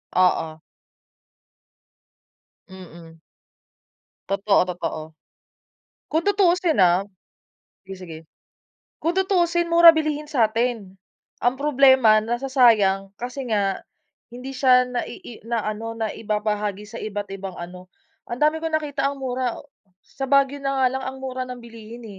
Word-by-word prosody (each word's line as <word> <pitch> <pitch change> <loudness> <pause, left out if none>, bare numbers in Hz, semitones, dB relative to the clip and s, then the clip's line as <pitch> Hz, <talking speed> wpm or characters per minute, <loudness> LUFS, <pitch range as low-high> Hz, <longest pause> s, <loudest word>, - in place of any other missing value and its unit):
Oo. 160 -3 +1 2.1
Mm. 170 -3 -13 1.1
Totoo, 200 +1 +2
totoo. 175 -3 -4 1.1
Kung 320 +2 0
tutusin 365 - +2
ah 180 +1 +4 0.8
sige, 195 0 -9
sige. 165 -3 -9 0.8
Kung 335 +3 -1
tutusin 345 -3 +1
mura 335 0 +9
bilihin 305 -1 -2
satin. 225 -5 0 0.4
Ang 245 +2 +1
problema, 260 -6 +5
nasasayang 225 -5 +2
kasi 250 +2 -6
nga, 200 -3 0 0.5
hindi 255 +2 -8
siya 255 -1 +4
na 250 -1 -2
ii 235 - -11
na 230 -2 -1
ano 225 +2 -4
na 220 -2 -2
ibabahagi 210 -1 -3
sa 230 +2 -8
iba't 205 -1 -5
ibang 195 -1 -7
ano, 180 +1 -9 0.4
ang 240 +3 -5
dami 305 +1 +2
ko 325 - -2
nakita 300 -3 -1
ang 280 -1 -7
mura 255 -2 -2 0.5
sa 270 - -6
Baguio 275 +1 +2
na 275 -1 0
nga - - +6
lang 265 0 -4
ang 265 0 -5
mura 255 -1 -4
ng 250 -1 -8
bilihin 230 0 -12
240 Hz, 125 wpm, -23 LUFS, 205-275 Hz, 2.1 s, mura